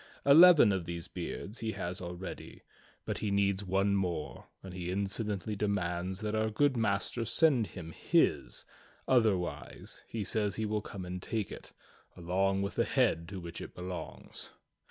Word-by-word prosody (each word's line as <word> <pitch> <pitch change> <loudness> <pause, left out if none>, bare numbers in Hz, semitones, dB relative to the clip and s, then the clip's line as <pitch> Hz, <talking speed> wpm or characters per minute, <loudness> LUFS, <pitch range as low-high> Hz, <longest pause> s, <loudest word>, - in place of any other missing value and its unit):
Eleven 155 - +9
of 95 -3 -1
these 85 -1 -4
beards 105 +5 -5
he 110 -1 -2
has 90 +1 -4
already, 90 +1 -7 0.4
but - - -3
he 105 - -1
needs 100 0 +1
one 100 +1 +2
more, 90 -5 -2 0.2
and 95 -1 -8
he 90 -1 -4
insolently 100 +2 -2
demands 95 -2 -1
that 105 0 -2
our 110 0 +1
good 135 +5 +2
Master 110 +1 0
send 120 0 +3
him 85 -3 -8
his, - - +1 0.4
otherwise 110 -8 0
he 110 -2 -3
says 105 0 0
he 110 - -1
will 105 0 -1
come 95 -2 -7
and 90 0 -5
take 110 0 -2
it, - - -9 0.5
along 95 +3 +1
with 100 - -3
the - - +2
head 85 +1 +2
to 100 -1 -6
which 85 -2 -7
it - - -9
belongs. 90 0 -7
100 Hz, 160 wpm, -32 LUFS, 90-110 Hz, 0.5 s, Eleven